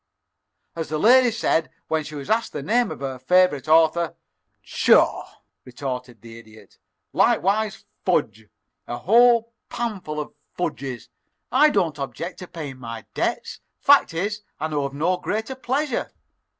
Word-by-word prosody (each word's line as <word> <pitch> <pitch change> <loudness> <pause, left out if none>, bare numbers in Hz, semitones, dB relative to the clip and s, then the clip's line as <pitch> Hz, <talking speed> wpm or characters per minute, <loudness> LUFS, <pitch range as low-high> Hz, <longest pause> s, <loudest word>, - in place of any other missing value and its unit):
"As 165 -1 -4
the 155 - -1
lady 245 +8 +6
said 215 -8 0 0.2
when 160 -1 0
she 150 +1 -9
was 140 -2 -7
asked 225 +1 0
the 140 - -5
name 240 - +2
of - - -8
her 135 -2 -4
favorite 180 -3 +3
author, 160 +1 +3 0.5
'Pshaw!'" - - +3 0.3
retorted 125 -3 -6
the 115 0 -11
Idiot. 110 -3 -18 0.3
"Likewise 205 +2 +1 0.2
fudge 110 - 0 0.4
a 120 - -4
whole 235 - +4 0.2
panful 200 -10 -4
of 150 - -6 0.2
fudges! 135 -7 -4 0.4
I 305 - +6
don't 170 - 0
object 150 +5 -5
to 180 - -8
paying 145 -7 -8
my 115 -2 -7
debts; - - -2 0.2
fact - - +4
is, 205 +5 -2 0.2
I 155 - -2
know 145 -2 -1
of 140 0 -5
no 175 +5 +1
greater 220 +7 -3
pleasure. 260 +1 -2
160 Hz, 145 wpm, -23 LUFS, 135-215 Hz, 0.5 s, lady